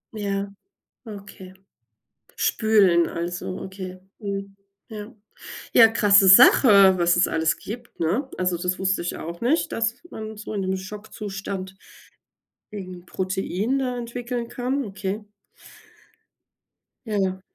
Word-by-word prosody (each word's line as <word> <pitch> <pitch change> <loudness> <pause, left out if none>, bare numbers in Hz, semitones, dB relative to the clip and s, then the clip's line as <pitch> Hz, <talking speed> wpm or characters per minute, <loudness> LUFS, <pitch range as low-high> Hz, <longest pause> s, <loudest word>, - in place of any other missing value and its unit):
Ja, 200 -1 -3 0.5
okay. 200 -3 -11 0.8
Spülen 200 -7 +3
also, 175 +2 -5
okay. 185 -1 -8 0.2
Mhm. 200 -1 -5 0.3
Ja. 215 +1 -9 0.6
Ja, 230 - +8
krasse 205 -3 +5
Sache, 200 -2 +8
was 175 -1 +3
es 175 - +3
alles 160 0 0
gibt, 235 +3 -9
ne? 200 - -1
Also, 180 -1 0
das 180 +2 -2
wusste 190 -1 0
ich 175 - -4
auch 170 +1 -7
nicht, 275 +8 +1
dass 230 +1 0 0.2
man 220 0 -7
so 215 +1 -7
in 200 - -2
dem 190 0 -1
Schockzustand 195 -1 -7 1.0
irgend 185 -4 -8
'n - - -29
Protein 190 +7 -2
da 250 -2 -2
entwickeln 240 0 -5
kann. 255 +2 -2
Okay. 200 +1 -5 1.8
Ja. 190 -4 -1
200 Hz, 120 wpm, -23 LUFS, 185-220 Hz, 1.8 s, Ja